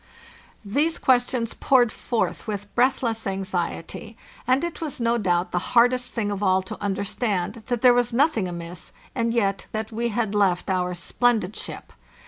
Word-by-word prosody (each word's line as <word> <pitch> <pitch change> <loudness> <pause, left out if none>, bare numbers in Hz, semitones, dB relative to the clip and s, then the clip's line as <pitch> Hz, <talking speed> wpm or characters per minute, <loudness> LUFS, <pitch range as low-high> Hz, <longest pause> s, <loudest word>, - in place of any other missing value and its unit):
These 295 +11 +1
questions 245 -2 +1
poured 245 -4 +3
forth 230 0 -2
with 205 -1 -5
breathless 235 -3 +1
anxiety, 190 +2 -4 0.3
and 255 +4 +3
it 340 -1 -4
was 305 -6 -4
no 235 0 +1
doubt 180 -3 +1
the 180 - +1 0.2
hardest 245 +1 +4
thing 210 -3 -2
of 200 0 -3
all 190 -1 +3
to 190 - -8
understand 200 +1 -2
that 245 -2 -2
there 250 -1 +8
was 245 0 +2
nothing 235 - +2
amiss, 170 0 -7 0.2
and 230 -1 0
yet 200 -4 0
that 220 0 -3
we 235 +2 -1
had 220 -2 -1
left 195 -3 +2
our 180 -1 0
splendid 215 +2 +1
ship. - - -6
220 Hz, 160 wpm, -24 LUFS, 190-245 Hz, 0.3 s, there